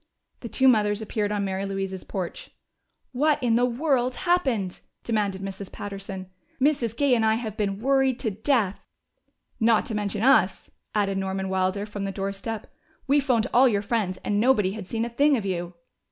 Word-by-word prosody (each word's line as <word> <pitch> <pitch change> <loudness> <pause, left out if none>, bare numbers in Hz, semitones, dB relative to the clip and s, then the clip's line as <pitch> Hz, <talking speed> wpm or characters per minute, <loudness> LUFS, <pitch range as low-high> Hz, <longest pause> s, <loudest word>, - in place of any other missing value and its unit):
The 235 - -7
two 265 +3 +3
mothers 210 -4 +3
appeared 215 -1 -2
on 205 -1 -1
Mary 190 0 -2
Louise's 195 -1 -4
porch. 185 -3 -5 0.6
"What 295 +4 +2
in 235 -2 +3
the 245 +1 +3
world 255 -1 0
happened?" 265 - 0 0.2
demanded 205 -4 -1
Mrs. 195 0 -6
Patterson. 195 -2 -7 0.3
"Mrs. 255 -5 +1
Gay 280 -2 +3
and 230 -2 +3
I 220 0 +3
have 220 -3 -4
been 200 -2 -1
worried 270 0 +2
to 220 - -1
death." 215 -2 0 0.8
"Not 225 -1 +3
to 220 - -4
mention 205 0 -2
us," 270 - +3 0.2
added 195 -2 +1
Norman 190 0 -2
Wilder 190 +2 0
from 205 -1 -5
the 195 - -2
doorstep. 195 +3 -4 0.4
"We 280 +2 +4
phoned 250 -5 +2
all 255 +2 +7
your 205 -2 0
friends, 205 -4 -1
and 205 0 0
nobody 215 -5 +3
had 200 -2 -7
seen 225 +2 -1
a - - -2
thing 280 +4 +3
of 215 - -4
you." 175 -2 -3
210 Hz, 180 wpm, -25 LUFS, 195-245 Hz, 0.8 s, all